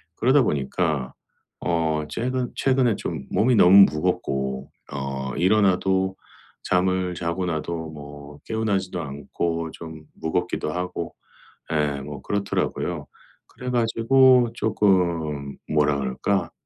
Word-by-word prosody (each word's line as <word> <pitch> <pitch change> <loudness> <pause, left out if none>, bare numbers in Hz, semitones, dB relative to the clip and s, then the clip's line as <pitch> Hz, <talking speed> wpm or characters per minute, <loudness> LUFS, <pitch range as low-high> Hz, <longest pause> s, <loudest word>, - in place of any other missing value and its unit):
그러다 130 +4 +4
보니까 70 - -1 0.5
어 80 -3 0
최근 125 +1 -2
최근에 130 -4 +2
좀 75 -6 -5
몸이 120 +3 +3
너무 100 0 +8
무겁고 65 -3 -2 0.2
어 65 -1 -4
일어나도 95 0 +2 0.5
잠을 90 0 +1
자고 85 +2 -2
나도 80 -1 -3
뭐 70 -1 -11
개운하지도 100 -5 -1
않고 80 +3 -3
좀 80 -2 -10
무겁기도 85 -1 -2
하고 90 -1 -4 0.6
예 75 -2 0
뭐 70 0 -8
그렇더라고요. 90 -5 -2 0.4
그래 125 - -7
가지고 120 +1 +4
쪼끔 85 -10 +1
뭐라 75 -1 +2
그럴까. 65 -1 -1
85 Hz, 240 characters per minute, -24 LUFS, 75-100 Hz, 0.6 s, 너무